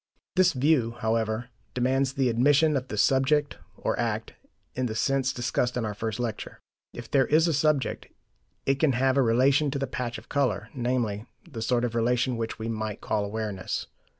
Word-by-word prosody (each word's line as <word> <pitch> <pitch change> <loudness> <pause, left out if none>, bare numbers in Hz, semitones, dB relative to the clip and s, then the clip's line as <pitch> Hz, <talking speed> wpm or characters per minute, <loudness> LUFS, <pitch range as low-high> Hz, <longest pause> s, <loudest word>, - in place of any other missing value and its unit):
This 185 -1 +4
view, 130 -4 +2
however, 110 +1 -1 0.3
demands 130 +2 +1
the 135 -2 +1
admission 145 +6 +3
of 130 -1 -2
the 105 - -5
subject, 135 +7 +2 0.2
or - - -2
act, - - -2 0.4
in 130 0 -1
the 110 - -4
sense 135 +3 +1
discussed 125 0 -1
in 120 - -1
our 105 - -3
first 110 +2 -4
lecture. 120 -3 -4 0.3
If 120 - -10
there 135 -2 +3
is 160 +3 +4
a 165 - +1
subject, 150 -1 +1 0.6
it 135 0 +1
can 155 -4 +3
have 130 +1 +2
a 140 - +4
relation 130 +5 +3
to 140 - -2
the 135 - -1
patch 120 -3 -4
of - - -13
colour, 130 -6 0
namely, 120 -4 -1 0.2
the 120 -9 -7
sort 120 +1 +1
of 120 - -3
relation 120 +2 +1
which 115 -1 -4
we 110 - -5
might 110 -2 -3
call 105 - -1
awareness. 105 -2 -3
125 Hz, 185 wpm, -27 LUFS, 115-135 Hz, 0.6 s, This